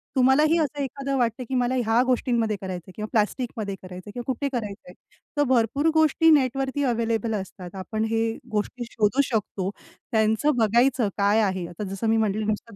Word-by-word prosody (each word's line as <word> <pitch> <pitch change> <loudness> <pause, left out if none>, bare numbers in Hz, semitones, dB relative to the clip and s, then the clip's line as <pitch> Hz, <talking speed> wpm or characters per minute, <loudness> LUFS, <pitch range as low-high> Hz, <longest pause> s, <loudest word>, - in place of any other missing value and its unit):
तुम्हालाही 285 +6 +4
असं 290 -1 -1
एखादं 275 +1 -3
वाटतंय 240 0 0
की 260 - -1
मला 250 +1 +1
ह्या 235 -1 +2
गोष्टींमध्ये 235 -4 +1
करायचंय 185 -1 -6
किंवा 215 0 -4
प्लास्टिकमध्ये 215 -2 -1
करायचंय 185 +2 -9
किंवा 245 +2 -6
कुठे 280 +2 -1
करायचंय, 200 -6 -5 0.4
तर 290 - +4
भरपूर 255 +5 +2
गोष्टी 315 +1 +4
नेटवरती 270 0 +2
अवेलेबल 230 -2 0
असतात. 185 -2 -7
आपण 215 +4 -3
हे 225 0 +1 0.3
गोष्टी 215 +3 -2
शोधू 225 +5 +2
शकतो, 205 -5 -2 0.4
त्यांचं 220 +6 +2
बघायचं 235 +1 +3
काय 205 +2 +3
आहे, 190 -3 0
आता 175 +4 -7
जसं 210 +3 -2
मी 225 - +3
म्हटलं 215 0 0
नुसतं 215 0 -3
230 Hz, 165 wpm, -25 LUFS, 210-260 Hz, 0.4 s, तुम्हालाही